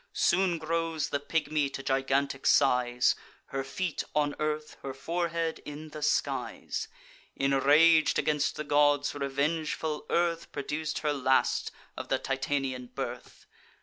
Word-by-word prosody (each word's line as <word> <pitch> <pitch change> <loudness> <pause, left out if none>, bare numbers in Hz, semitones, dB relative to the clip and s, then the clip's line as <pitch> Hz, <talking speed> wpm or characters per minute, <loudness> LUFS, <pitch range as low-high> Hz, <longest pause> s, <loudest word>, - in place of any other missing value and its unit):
Soon 180 -1 +2
grows 165 -1 -1
the 145 - -1
pigmy 150 -1 0
to 135 0 -7
gigantic 135 +1 0
size; 125 -3 +4 0.3
Her 135 0 -3
feet 160 +5 -3
on 145 -1 +2
earth, 150 0 -2
her 135 -1 -6
forehead 165 +2 -2
in 150 +1 -8
the 150 0 -8
skies. 150 - -1 0.5
Inrag'd 145 +4 +5
against 150 -1 +1
the 155 - -4
gods, 145 0 +3
revengeful 150 +2 -2
Earth 170 -1 0
Produc'd 150 +2 -3
her 150 - +2
last 130 -1 +2 0.3
of - - -6
the - - +2
Titanian 135 -2 -2
birth. - - -7
145 Hz, 125 wpm, -29 LUFS, 135-160 Hz, 0.5 s, Inrag'd